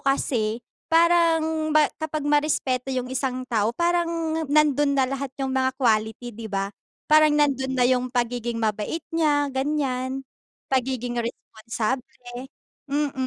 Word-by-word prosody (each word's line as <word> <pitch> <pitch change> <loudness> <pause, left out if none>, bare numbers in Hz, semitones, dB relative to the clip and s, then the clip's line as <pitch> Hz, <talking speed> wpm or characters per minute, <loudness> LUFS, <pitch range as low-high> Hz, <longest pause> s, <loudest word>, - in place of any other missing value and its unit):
kasi 240 -4 0 0.2
parang 325 -2 +3
ba 305 0 +5 0.2
kapag 310 -1 -3
marespeto 290 -3 +1
yung 255 -2 -1
isang 255 -1 -2
tao 220 -4 +1
parang 345 0 +2 0.4
nandun 290 -1 +3
na 265 - +4
lahat 275 +1 -3
yung 265 -1 -2
mga 260 0 +2
quality, 225 0 0
di 220 0 -7
ba? 195 0 -2 0.3
Parang 305 -1 +5
nandun 265 -3 +1
na 250 - +3
yung 255 0 +2
pagiging 240 -1 -2
mabait 220 +7 -2
niya, 295 -3 +2
ganyan, 265 -1 -1 0.5
pagiging 250 -2 0
responsable, 245 +2 -5 0.4
mm. 290 0 0
265 Hz, 125 wpm, -24 LUFS, 245-295 Hz, 0.5 s, ba